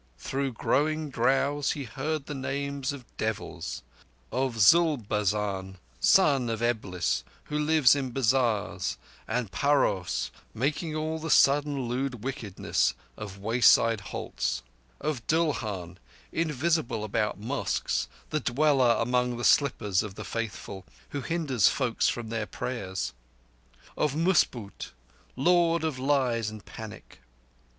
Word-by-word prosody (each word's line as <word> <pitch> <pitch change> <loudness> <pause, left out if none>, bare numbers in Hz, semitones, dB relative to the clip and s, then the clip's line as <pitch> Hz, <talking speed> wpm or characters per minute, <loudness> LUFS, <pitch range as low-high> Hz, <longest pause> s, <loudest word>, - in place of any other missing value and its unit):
Through 135 -1 -2
growing 155 +5 0
drowse 135 +4 +1
he 145 - -5
heard 140 +5 -3
the 150 - -5
names 140 +1 -2
of 140 -4 -8
devils—of 90 - -4
Zulbazan, 105 - +2 0.2
Son 140 - +4
of 115 0 -2
Eblis, 105 -7 0 0.2
who 150 - -3
lives 150 -3 +5
in 135 -2 -2
bazars 115 -7 +1 0.3
and 120 -5 -2
paraos, 140 -11 +1 0.2
making 150 +5 -1
all 155 +1 -2
the 165 +1 -5
sudden 140 -2 +4
lewd 125 -2 -2
wickedness 105 - -1 0.2
of 100 -2 -8
wayside 115 +1 +4
halts; - - -3 0.4
of 140 -7 -3
Dulhan, 110 - -1 0.3
invisible 155 -7 0
about 110 0 -1
mosques, 125 +7 -1 0.2
the 155 - +1
dweller 130 -2 +3
among 125 0 +1
the 120 - -5
slippers 105 -9 +3
of 105 -3 -6
the - - -7
faithful, 100 -4 -5 0.3
who 140 - -4
hinders 135 - +2
folk 125 -4 -1
from 115 -2 +1
their 110 -2 -2
prayers; 95 -3 -4 0.8
and 150 +2 0
Musboot, 120 - 0 0.4
Lord 170 +3 +3
of 155 -5 -2
lies 130 -5 +1
and 110 -2 -10
panic. - - -10
125 Hz, 115 wpm, -28 LUFS, 105-145 Hz, 0.8 s, lives